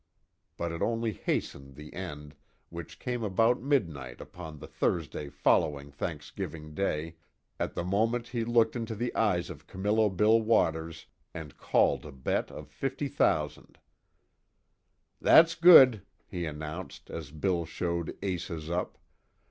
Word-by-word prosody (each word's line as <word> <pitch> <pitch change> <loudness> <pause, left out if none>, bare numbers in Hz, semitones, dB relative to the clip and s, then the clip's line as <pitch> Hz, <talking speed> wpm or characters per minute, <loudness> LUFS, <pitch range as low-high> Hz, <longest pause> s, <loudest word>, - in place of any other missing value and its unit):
But 85 -1 -2
it 85 - -5
only 115 -1 0
hastened 70 -7 -3
the 75 +1 -11
end, 75 -5 -7 0.4
which 85 0 -8
came 125 -2 -3
about 115 +4 +2
midnight 80 - -1
upon 80 -3 -9
the - - -9
Thursday 75 -3 -2
following 70 0 +1
Thanksgiving 75 +1 -6
Day, 80 -2 -2 0.4
at - - -2
the - - -2
moment 115 +6 0
he 120 -2 -2
looked 115 0 +3
into 115 -2 -3
the 120 +3 -2
eyes 100 -6 +1
of - - -12
Camillo 105 +3 +1
Bill 105 +4 +4
Waters 80 -7 +1 0.3
and 80 -4 -7
called - - +2
a 75 - -9
bet 65 -1 -2
of - - -9
fifty - - -3
thousand: - - 0 1.4
"That's 165 0 +7
good," 135 - +8 0.2
he 90 -2 -4
announced, 75 +4 -7
as 80 -5 -6
Bill 85 +3 -1
showed 85 0 -3
Aces 85 -4 -3
up. 90 +1 -2
85 Hz, 135 wpm, -29 LUFS, 75-110 Hz, 1.4 s, good